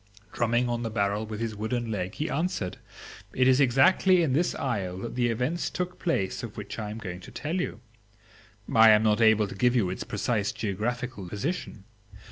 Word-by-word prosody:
Drumming 120 +1 +1
on 120 -1 -2
the 115 - -2
barrel 105 0 -1
with 105 -1 -6
his 115 -1 -3
wooden 115 +2 -2
leg, 95 -2 -3
he 155 - -2
answered, 160 - -2 0.6
"It 130 0 +4
is 130 +1 +5
exactly 175 +8 +4
in 140 -5 +1
this 170 +6 +1
isle 95 -8 -2
that 115 +5 -6
the 120 -1 +1
events 125 +9 -1
took 180 +3 -4
place 100 - -1
of 115 -3 -8
which 105 +2 -6
I 105 -1 -4
am 105 - -6
going 90 -5 -6
to - - -12
tell 160 +4 -3
you. 115 - -5 0.9
I 110 -1 +8
am 105 0 +6
not 110 +1 +2
able 110 -2 +5
to - - -8
give 125 +5 +2
you 100 -7 +2
its 95 - -4
precise 105 0 -1
geographical 110 0 -3
position. 110 - -4
115 Hz, 195 wpm, -27 LUFS, 105-130 Hz, 0.9 s, I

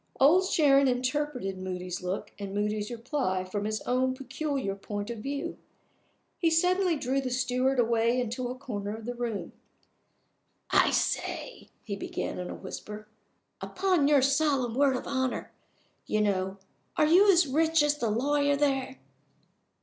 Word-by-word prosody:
Old 350 +8 +5
Sharon 280 -6 +4
interpreted 250 -5 -1
Moody's 180 -1 -5
look 180 +2 -4
and 200 -1 -5
Moody's 210 0 -1
reply 235 -6 -2
from 200 +2 -4
his 215 0 -2
own 255 +1 0
peculiar 270 -4 -3
point 205 +2 -5
of 230 - -6
view. 280 +5 -4 0.8
He 335 - +3
suddenly 360 +2 +2
drew 270 0 0
the 260 - -3
steward 255 +1 0
away 235 +1 +2
into 245 +1 -2
a 250 - -5
corner 210 -5 -5
of 225 - -10
the 245 - -3
room. 235 -4 -4 1.2
"I - - +5
say!" - - -2
he 200 - -4
began, 195 - -4
in 180 - -5
a - - -5
whisper. 210 +2 -8 0.5
"Upon 365 -6 +1
your 290 -3 +5
solemn 275 -3 +2
word 270 +1 +3
of - - -4
honor, 260 -2 -2 0.6
you 215 - 0
know 190 -2 0 0.4
are - - +5
you 375 +6 +6
as 345 -3 +4
rich 320 +3 +2
as 295 0 +1
the 235 - 0
lawyer 285 +5 +2
there?" 270 -2 0
255 Hz, 150 wpm, -28 LUFS, 215-285 Hz, 1.2 s, you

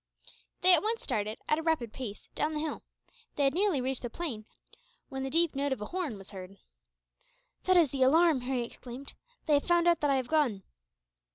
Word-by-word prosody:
They 365 0 +8
at 340 - +5
once 450 +2 -1
started, 215 +1 -2
at 305 - +2
a - - -2
rapid 315 -9 -1
pace, 230 -6 -7
down 310 +1 -1
the - - -1
hill. 310 0 -3 0.5
They 290 - +1
had 275 -1 +3
nearly 375 -4 +2
reached 260 0 -2
the 240 - -4
plain 235 -7 -5 0.6
when 265 0 -5
the 270 - -2
deep 330 +3 +2
note 280 0 -1
of 265 - -6
a 210 - -4
horn 345 - -3
was 195 -1 -9
heard. 190 0 -9 1.1
"That 370 -1 +4
is 325 -6 +4
the 275 - -3
alarm!" 310 +1 +5
Harry 250 -1 -1
exclaimed. 250 +3 -9 0.3
"They 305 - +2
have 285 - +2
found 345 -1 +3
out 340 -1 +4
that 295 - +1
I 275 - +3
have 260 -2 -1
gone." 260 -11 +1
280 Hz, 210 wpm, -30 LUFS, 245-330 Hz, 1.1 s, They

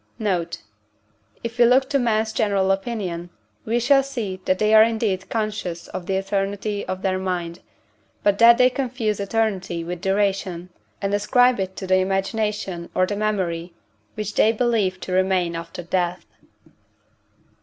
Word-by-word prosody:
Note. 180 - -2 0.8
If 235 +1 -6
we 240 - +7
look 260 +2 +4
to 280 - +3
men's 220 -2 +1
general 200 -3 +1
opinion, 195 -4 -3 0.4
we 235 +2 +1
shall 275 +3 +4
see 230 -9 -5
that 185 - +2
they 215 +1 +2
are 215 - +9
indeed 220 -4 +1
conscious 215 -6 -3
of 175 - -6
the 195 - 0
eternity 200 +1 -2
of 185 +1 -4
their 185 -1 0
mind, 175 -2 -3 0.6
but 205 -1 +2
that 235 0 +8
they 250 0 +5
confuse 245 -6 -2
eternity 200 -5 -1
with 175 +1 -6
duration, 190 -3 -1 0.3
and 195 0 0
ascribe 245 +4 +3
it 190 0 -3
to 190 - -6
the 185 0 +3
imagination 195 -1 -1
or 185 - +3
the 205 - -3
memory 180 -5 -2 0.4
which 210 -1 -4
they 220 - +4
believe 220 -5 0
to - - -6
remain 185 -2 +1
after 170 +1 -7
death. 175 0 -1
195 Hz, 155 wpm, -22 LUFS, 185-220 Hz, 0.8 s, are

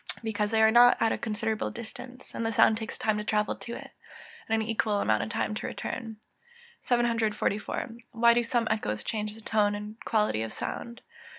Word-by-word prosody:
_ - - -26
Because 210 -2 -1
they 220 0 +3
are 240 +2 +7
at 225 - +3
a - - 0
considerable 220 0 -2
distance, 245 +2 -10
and - - -3
the 225 - 0
sound 220 0 +5
takes 220 - -5
time 215 -1 0
to - - -3
travel 210 0 +1
to 235 - -7
it, - - -9 0.6
and 225 0 +2
an 220 - -2
equal 215 -2 +1
time 110 - 0
to 215 - -4
return. 225 -4 -5 0.6
744. 230 -4 0 0.3
_Why 235 +1 +6
do 240 - +3
some 235 0 0
echoes 105 - -1
change 210 - -3
the 225 - -12
tone 210 -1 +2
and 210 +2 -8
quality 210 - +1
of 110 0 -3
sound? 235 +1 -5
220 Hz, 185 wpm, -28 LUFS, 210-230 Hz, 0.6 s, are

